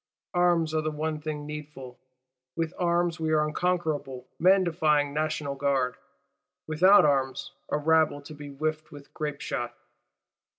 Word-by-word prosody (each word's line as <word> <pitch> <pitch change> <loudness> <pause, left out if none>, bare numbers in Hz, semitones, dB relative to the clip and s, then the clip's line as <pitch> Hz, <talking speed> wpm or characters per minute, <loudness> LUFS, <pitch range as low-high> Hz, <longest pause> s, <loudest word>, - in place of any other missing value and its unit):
Arms 175 -3 +2
are 155 - +1
the 155 - -1
one 155 0 -3
thing 150 -1 -4
needful: 150 -4 -8 0.6
with 165 0 -2
arms 175 -1 +1
we 160 -1 -1
are 155 -1 +4
an 150 - -1
unconquerable 155 -7 -2
man 190 +3 +5
defying 150 -4 +1
National 155 -2 -1
Guard; 135 -2 0 0.7
without 180 +5 +6
arms, 135 -3 0 0.2
a - - +1
rabble 155 -1 +2
to 155 - -10
be 145 -1 -9
whiffed 155 +2 -3
with 145 -1 -13
grapeshot. 150 -2 -4
155 Hz, 140 wpm, -27 LUFS, 145-160 Hz, 0.7 s, without